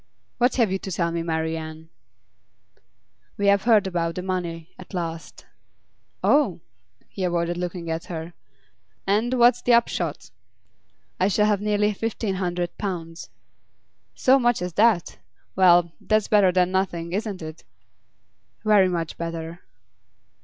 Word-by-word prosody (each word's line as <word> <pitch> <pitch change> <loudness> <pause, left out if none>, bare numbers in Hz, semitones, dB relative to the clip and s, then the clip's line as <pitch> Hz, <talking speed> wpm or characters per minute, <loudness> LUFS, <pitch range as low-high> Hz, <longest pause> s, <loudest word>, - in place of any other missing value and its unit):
'What 245 0 +3
have 230 -6 +2
you 190 - -1
to 190 - -7
tell 170 -1 0
me, 170 0 -2
Marian?' 160 -1 -4 1.5
'We 200 - -1
have 200 -1 +4
heard 220 -4 +5
about 170 -3 -2
the 180 - -4
money, 170 -3 -4
at 185 +1 -10
last.' 165 -2 -5 0.8
'Oh?' 280 - +3 0.5
He 195 - -6
avoided 175 -1 0
looking 175 -1 -4
at 160 +1 -3
her. 165 0 -6 0.7
'And 220 +6 +1
what's 245 0 +4
the 245 - +3
upshot?' 175 -9 -1 0.9
'I 185 - +3
shall 210 +1 +2
have 205 -2 +1
nearly 210 0 +1
fifteen 220 -1 -3
hundred 175 -1 -2
pounds.' 170 -4 -5 0.9
'So 265 +1 +4
much 240 -6 +1
as 180 -1 -4
that? 210 -4 +2 0.4
Well, 175 -2 +5
that's 215 -1 +1
better 205 -3 +4
than 180 0 +2
nothing, 175 -3 -2
isn't 205 -3 -3
it?' 155 +1 -9 1.0
'Very 205 -3 +5
much 165 -3 -3
better. 165 0 -5
180 Hz, 135 wpm, -24 LUFS, 170-210 Hz, 1.5 s, heard